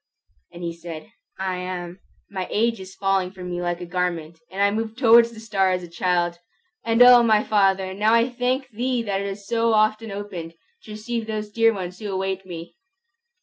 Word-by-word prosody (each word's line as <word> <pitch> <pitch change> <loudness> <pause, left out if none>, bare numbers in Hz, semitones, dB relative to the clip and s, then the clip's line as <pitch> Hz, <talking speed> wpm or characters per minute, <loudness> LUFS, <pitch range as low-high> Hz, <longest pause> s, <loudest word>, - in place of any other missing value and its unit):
And 175 - -10
he 170 -1 -3
said, 170 +3 -9 0.3
"I 190 -1 -2
am. 180 0 -5 0.3
My 190 -2 -4
age 230 0 +1
is 190 0 -10
falling 195 -2 +1
from 180 -1 -8
me 175 0 -3
like 175 0 -2
a - - -5
garment, 170 -2 -3
and 190 - -8
I 200 0 +4
move 220 +1 -3
towards 235 -2 +6
the 230 -1 -12
star 200 -4 +1
as 180 -1 -1
a - - -8
child. 175 0 0 0.4
And 230 +2 +5
O, 245 -1 +9
my 220 -2 +3
Father, 195 -2 +2
now 215 +3 +3
I 230 +1 +4
thank 255 +2 -1
thee 245 +1 -1
that 200 -2 -1
it 200 - -3
has 200 +1 -7
so 230 +1 +1
often 215 +1 +2
opened, 195 -5 -7 0.3
to 215 - -10
receive 225 +1 -4
those 215 -1 -4
dear 225 +1 +4
ones 185 -3 -6
who 210 -2 -5
await 190 0 -3
me!" 170 -1 -9
195 Hz, 200 wpm, -23 LUFS, 180-225 Hz, 0.4 s, O